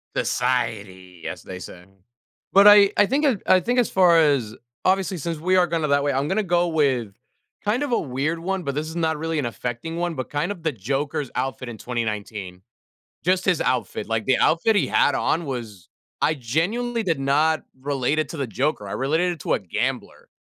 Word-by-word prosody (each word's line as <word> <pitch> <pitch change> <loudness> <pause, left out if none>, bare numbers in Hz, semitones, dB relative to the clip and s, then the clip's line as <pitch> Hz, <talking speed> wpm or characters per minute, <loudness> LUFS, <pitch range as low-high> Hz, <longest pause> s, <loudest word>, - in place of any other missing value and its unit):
"Society", 100 -8 -2
as - - -6
they 95 -1 -8
say. 90 -1 -11 0.7
But 200 +2 +7
I 205 -1 +8
I 205 - +6
think 270 -3 +1
I 185 - +6
think 245 +7 -1
as 245 - +2
far 180 -3 +5
as 135 -8 +2 0.3
obviously, 190 -1 +1
since 165 +1 -3
we 185 +3 +1
are 180 -1 +4
gonna 165 -2 -1
that 140 0 +3
way, 145 - +1
I'm 135 +2 0
gonna 195 +5 +1
go 175 -1 +1
with 135 -10 0 0.5
kind 220 +7 0
of 285 - -3
a 235 - +2
weird 145 +4 -2
one, 190 +2 -2
but 140 -3 -3
this 155 +2 -2
is 160 - -8
not 160 -2 0
really 160 0 -2
an 135 - -1
affecting 120 +7 -5
one, 175 -1 -2
but 130 - -5
kind 150 +7 -1
of 175 -5 -8
the 160 - +1
Joker's 135 +4 -3
outfit 130 -1 -3
in 115 - -8
2019. 105 -6 -4 0.6
Just 185 +1 +2
his 180 -4 +2
outfit. 125 -4 -1
Like, 115 -1 -1
the 130 - +3
outfit 190 +7 +3
he 200 - +2
had 145 - +3
on 165 0 0
was 115 -9 -7 0.3
I 155 - +3
genuinely 200 - -1
did 165 -7 0
not 150 +4 +2 0.2
relate 140 +1 0
it 155 - -1
to 165 - -7
the 135 - -2
Joker. 120 -1 -2
I - - -5
related 160 +7 0
it 170 - -12
to - - 0
a - - +1
gambler 90 - -4
150 Hz, 205 wpm, -23 LUFS, 125-175 Hz, 0.7 s, I